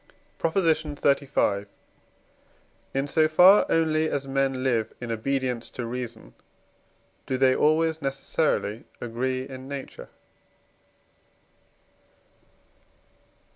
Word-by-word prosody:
PROP. 165 - -1
XXXV. 145 - +1 1.3
In 135 +1 +1
so 155 +2 +3
far 180 +6 +6
only 160 -1 +2
as 140 -1 -3
men 135 -1 0
live 115 -4 0
in 120 -2 -5
obedience 125 +1 -2
to 125 - -6
reason, 120 -1 -6 0.9
do 130 - -1
they 130 0 +4
always 160 +1 +2
necessarily 135 -5 -1
agree 130 +2 -3
in 130 0 -9
nature. 140 -1 -8
135 Hz, 90 wpm, -25 LUFS, 125-155 Hz, 1.3 s, far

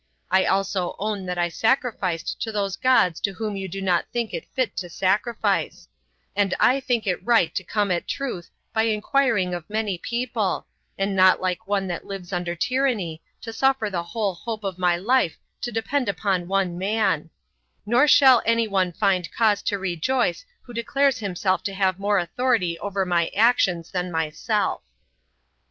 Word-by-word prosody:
I 190 0 +4
also 190 -2 0
own 205 -2 -3
that 180 0 -3
I 175 0 +1
sacrificed 205 -6 -1
to 225 - -2
those 200 -2 -1
gods 195 -9 +3
to 200 - -1
whom 215 +1 -4
you 195 -1 -4
do 195 +2 -6
not 180 -3 +1
think 235 -2 -2
it - - -5
fit 255 -2 0
to 180 - -4
sacrifice; 200 +6 0 0.5
and 200 -2 +1
I 260 +2 +4
think 245 -4 -1
it 180 -3 -1
right 230 -8 +3
to 190 - -2
come 205 +1 0
at 175 - -1
truth 245 -11 -4 0.2
by 220 0 +2
inquiring 215 -3 +1
of 175 -3 -6
many 210 -4 -2
people, 235 -5 -2 0.3
and 195 0 -1
not 185 0 +5
like 185 0 -2
one 200 -1 0
that 175 - -5
lives 195 -2 -7
under 175 -1 -2
tyranny, 215 -7 -1 0.2
to 225 -1 -7
suffer 265 -3 +1
the 175 -2 -1
whole 200 +3 -2
hope 215 +5 -6
of 190 -2 -4
my 175 -1 +2
life 220 -1 +1 0.2
to 240 - -3
depend 240 +3 -1
upon 185 -1 -1
one 185 -2 0
man; 195 -5 0 0.6
nor 240 +7 +4
shall 265 -4 +7
any 230 0 +2
one 190 -3 +1
find 185 -1 0
cause 215 -3 +2
to 205 - -1
rejoice 195 - -1 0.2
who 245 - -12
declares 265 +3 +1
himself 190 -2 -1
to 195 - -3
have 190 -1 +1
more 205 +1 +1
authority 185 0 0
over 200 -1 -2
my 170 -2 +1
actions 195 -6 +2
than 180 -1 -2
myself." 160 -1 -1
195 Hz, 175 wpm, -24 LUFS, 180-230 Hz, 0.6 s, shall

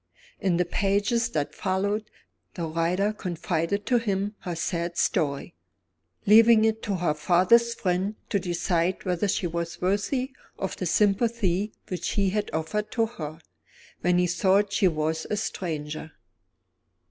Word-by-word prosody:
In 185 -3 +1
the 180 - +2
pages 205 +6 +1
that 145 -2 -2
followed, 200 +3 -1 0.5
the 170 - -3
writer 170 +6 0
confided 180 0 -2
to 245 -2 +3
him 205 -2 -1
her 175 -2 -5
sad 170 +1 -2
story; 150 -1 0 0.7
leaving 220 +1 +7
it 220 0 +1
to 205 -3 -2
her 175 -4 +1
father's 190 +9 +3
friend 190 +3 -1
to 200 - +1
decide 175 0 -1
whether 180 +2 0
she 195 -1 0
was 170 0 -3
worthy 205 +8 0 0.3
of 190 - -3
the 185 - -2
sympathy 205 0 +1 0.2
which 180 -2 -3
he 195 -2 +1
had 210 +1 -1
offered 160 +7 -2
to 230 -2 +2
her, 160 -8 -7 0.6
when 180 +1 +2
he 180 - +3
thought 195 +3 +2
she 200 - +4
was 160 -1 -1
a 210 - 0
stranger. 155 -7 -4
185 Hz, 145 wpm, -26 LUFS, 170-210 Hz, 0.7 s, leaving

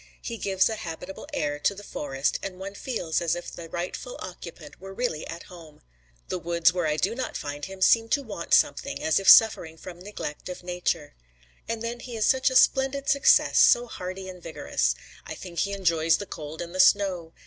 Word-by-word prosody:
He 230 -2 -6
gives 190 -1 +2
a 220 - -3
habitable 180 +6 -7
air 145 - -2
to 200 - +1
the 205 - -10
forest, 140 -6 -2
and 190 -2 -6
one 195 +1 -7
feels 200 -8 -2
as 170 -2 +1
if 175 - -7
the 165 -1 -9
rightful 180 +9 -5
occupant 170 -3 -10
were 195 0 -9
really 180 -11 -2
at 170 0 -7
home. 165 -4 -14 0.4
The 185 - -3
woods 170 +1 +2
where 175 -3 0
I 150 0 0
do 195 +8 0
not 255 +2 -4
find 145 0 -5
him 190 0 -4
seem 225 +3 +4
to 285 +2 +1
want 200 -8 0
something, 70 - +1
as 160 +3 +3
if 195 - +3
suffering 165 -7 +6
from 175 +1 -10
some - - -12
neglect 185 -6 -6
of 180 - -7
Nature. 175 -4 -2 0.6
And 230 0 -3
then 235 +1 -4
he 240 -1 -8
is 215 - +1
such 265 0 +3
a 260 - -4
splendid 270 +2 +3
success, 280 0 +5
so 240 - +6
hardy 190 -4 -7
and 180 -1 -9
vigorous. 60 - -1 0.3
I - - -6
think 175 -2 -7
he 200 - 0
enjoys 165 -5 +2
the 205 - -6
cold 160 -2 -7
and 170 0 -10
the 185 - -5
snow. 185 -3 +3
180 Hz, 210 wpm, -26 LUFS, 165-210 Hz, 0.6 s, suffering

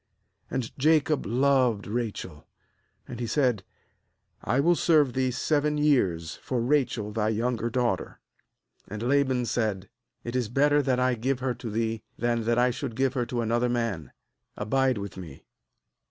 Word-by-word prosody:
18And 125 -3 -3
Jacob 155 -1 +2
loved 125 -2 +2
Rachel; 105 -8 -4 0.6
and 120 - -7
he 120 - -2
said: 125 -7 +1 0.8
'I 125 +5 +1
will 175 +4 +4
serve 150 -6 +3
thee 130 -1 +1
seven 150 +4 0
years 95 - +1
for 125 - -3
Rachel 120 -4 0
thy 110 0 0
younger 115 +1 -1
daughter.' 120 -6 -1 0.7
19And 105 +1 -6
Laban 130 -2 +2
said: 105 -5 -2 0.3
'It 120 +1 -5
is 125 -4 0
better 145 +4 +3
that 130 -2 0
I 125 0 +2
give 125 +3 -1
her 130 -1 0
to 120 -1 -7
thee, 110 +1 -2 0.2
than 120 -1 0
that 120 +1 +1
I 125 +1 +3
should 125 -1 -5
give 130 0 +1
her 120 -2 -1
to 120 -1 -2
another 120 +2 +1
man; 115 - -2 0.5
abide 130 +3 +1
with 100 -1 -6
me.' 80 -7 -10
120 Hz, 155 wpm, -27 LUFS, 110-135 Hz, 0.8 s, will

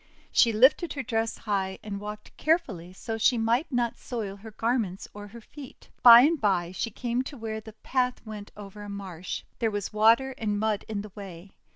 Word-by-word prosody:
She 230 - +5
lifted 260 +10 +4
her 275 - -4
dress 225 -2 -1
high, 195 -3 -2
and 200 -2 -5
walked 210 +1 -8
carefully 240 - 0
so 205 +4 -6
that 225 - -4
she 250 +1 +4
might 235 +7 +1
not 240 -2 -1
soil 215 -6 -5
her 220 +3 -10
garments 220 -3 -2
or 205 0 -9
her 235 +3 -12
feet. 275 +3 -13
By 235 -1 +11
and 305 +3 +2
by 180 -5 +1
she 210 +5 -3
came 240 +2 -2
to 280 - -8
where 220 -1 -5
the 220 0 -12
path 250 +3 -1
went 210 -2 -8
over 205 0 -10
a 205 - -8
marsh. 190 -3 -6 0.2
There 225 - +1
was 205 0 -4
water 230 +5 +4
and 210 -2 -1
mud 215 -1 -1
in 210 -2 -3
the 210 0 -10
way. 190 -2 -10
220 Hz, 205 wpm, -27 LUFS, 200-240 Hz, 0.2 s, By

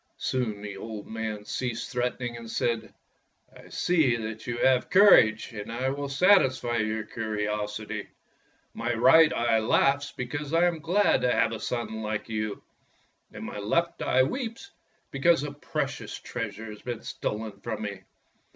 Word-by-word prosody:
Soon 110 -5 -2
the 100 -1 -6
old 110 0 -7
man 110 -2 -5
ceased 120 -1 -3
threatening 125 -1 -2
and 115 -1 -9
said: 115 -1 -1 0.6
''I - - -15
see 160 -9 +2
that 110 0 -6
you 120 0 -2
have 130 0 +3
courage, 185 - +6
and 105 0 -6
I 130 +3 -1
will 140 0 -4
satisfy 135 -7 +3
your 110 0 -1
curiosity. 105 -1 -3 0.7
My 115 +1 -2
right 160 +7 +6
eye 115 -1 +2
laughs 135 +5 +2
because 145 +5 -4
I 170 +1 +5
am 170 -2 0
glad 180 +6 +2
to 125 - +2
have - - +2
a 115 - -4
son 110 -1 -3
like 110 0 -3
you, 110 -2 -3 0.7
and - - -8
my - - -6
left 170 +12 0
eye 130 - +3
weeps 235 - -4 0.4
because 155 +3 +3
a 145 - -4
precious 145 - -4
treasure 110 -2 -5
has 105 - -11
been 120 -2 -5
stolen 105 -1 -4
from 110 -2 -4
me. 100 -2 -5
120 Hz, 155 wpm, -27 LUFS, 110-140 Hz, 0.7 s, courage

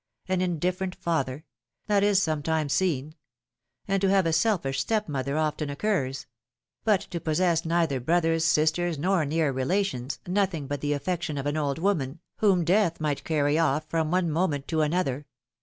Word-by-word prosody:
An 185 -1 0
indifferent 180 +2 -1
father! 150 -3 -2 0.2
— - - -55
that 205 -1 +2
is 205 -1 +4
sometimes 155 -3 0
seen: 155 -5 0 0.7
and 195 -1 +1
to 195 - +3
have 195 -2 +3
a 165 - +1
selfish 160 -7 +1
step 215 -2 0
mother 140 0 -2
often 155 -1 -1
occurs; 140 -4 -1 0.6
but 210 -4 +3
to 170 - -6
possess 165 +1 +1
neither 165 -5 +1
brothers, 165 +4 +1
sisters, 165 +1 +2
nor 175 +1 +1
near 155 0 +1
relations, 130 -1 -1
nothing 180 -5 0
but 145 0 -4
the 145 0 0
affection 155 0 -2
of 140 - -3
an 145 +1 -1
old 145 -3 -1
woman, 160 -5 -1 0.2
whom 190 -5 +3
Death 180 -1 +2
might 150 -2 -2
carry 150 -1 +1
off 155 -1 +1
from 160 -2 0
one 175 -1 +1
moment 150 -4 0
to 160 -2 +1
another! 150 -3 -1
160 Hz, 170 wpm, -26 LUFS, 145-185 Hz, 0.7 s, is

